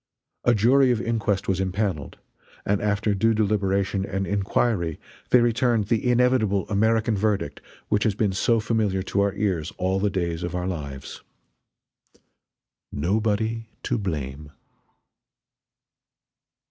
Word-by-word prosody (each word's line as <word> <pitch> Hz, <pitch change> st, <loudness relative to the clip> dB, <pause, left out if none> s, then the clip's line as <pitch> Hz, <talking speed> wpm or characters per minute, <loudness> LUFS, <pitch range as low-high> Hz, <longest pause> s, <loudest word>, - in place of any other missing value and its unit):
A 120 Hz, -, +4 dB
jury 130 Hz, +5 st, +4 dB
of 120 Hz, -3 st, +2 dB
inquest 110 Hz, -4 st, -1 dB
was 95 Hz, -1 st, 0 dB
impaneled, 95 Hz, -5 st, -2 dB, 0.5 s
and 100 Hz, 0 st, +1 dB
after 105 Hz, 0 st, +1 dB
due 115 Hz, +3 st, +2 dB
deliberation 100 Hz, -2 st, 0 dB
and 95 Hz, 0 st, -2 dB
inquiry 100 Hz, -3 st, 0 dB, 0.3 s
they 125 Hz, -, +6 dB
returned 115 Hz, -2 st, +1 dB
the 115 Hz, +1 st, +1 dB
inevitable 120 Hz, -5 st, +2 dB
American 110 Hz, +2 st, +2 dB
verdict 100 Hz, -6 st, -1 dB, 0.3 s
which 105 Hz, -1 st, +2 dB
has 105 Hz, -3 st, +1 dB
been 105 Hz, -2 st, 0 dB
so 115 Hz, +4 st, +2 dB
familiar 110 Hz, -4 st, 0 dB
to 100 Hz, +1 st, 0 dB
our 100 Hz, -1 st, +1 dB
ears 95 Hz, -6 st, -1 dB
all 95 Hz, +1 st, 0 dB
the 105 Hz, +1 st, +1 dB
days 85 Hz, -3 st, -2 dB
of 90 Hz, +1 st, -4 dB
our 90 Hz, 0 st, -2 dB
lives 70 Hz, -7 st, -6 dB, 1.7 s
"NOBODY 110 Hz, +6 st, -1 dB
TO 120 Hz, -, -1 dB
BLAME." 75 Hz, -6 st, -4 dB
100 Hz, 125 wpm, -24 LUFS, 95-110 Hz, 1.7 s, they